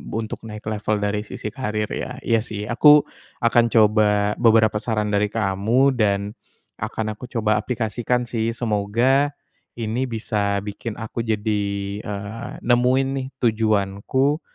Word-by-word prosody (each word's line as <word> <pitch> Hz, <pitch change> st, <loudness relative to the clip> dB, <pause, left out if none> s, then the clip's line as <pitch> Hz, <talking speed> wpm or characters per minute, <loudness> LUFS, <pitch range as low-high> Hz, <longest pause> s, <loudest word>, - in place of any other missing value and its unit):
untuk 110 Hz, -1 st, -3 dB
naik 105 Hz, 0 st, -8 dB
level 105 Hz, -1 st, -1 dB
dari 105 Hz, 0 st, 0 dB
sisi 105 Hz, -, -6 dB
karier 105 Hz, -5 st, -2 dB
ya. -, -, -4 dB
Iya 115 Hz, -1 st, +2 dB
sih 105 Hz, -2 st, -5 dB
aku 145 Hz, +7 st, +6 dB, 0.4 s
akan 115 Hz, 0 st, +4 dB
coba 105 Hz, -2 st, +3 dB
beberapa 110 Hz, -2 st, +4 dB
saran 105 Hz, -2 st, -1 dB
dari 105 Hz, 0 st, +2 dB
kamu 110 Hz, +6 st, +2 dB
dan 100 Hz, -1 st, +1 dB, 0.5 s
akan 110 Hz, 0 st, -3 dB
aku 125 Hz, -, -9 dB
coba 110 Hz, -3 st, +1 dB
aplikasikan 120 Hz, +1 st, -1 dB
sih 115 Hz, -1 st, -2 dB
semoga 120 Hz, +6 st, +1 dB, 0.4 s
ini 115 Hz, +2 st, -2 dB
bisa 105 Hz, -3 st, -1 dB
bikin 105 Hz, +2 st, -6 dB
aku 115 Hz, +1 st, -4 dB
jadi, 105 Hz, -1 st, 0 dB, 0.4 s
eee, 105 Hz, +2 st, -6 dB
nemuin 125 Hz, +2 st, +3 dB
nih 130 Hz, -, -4 dB, 0.2 s
tujuanku 110 Hz, +6 st, +1 dB
110 Hz, 130 wpm, -22 LUFS, 105-120 Hz, 0.5 s, aku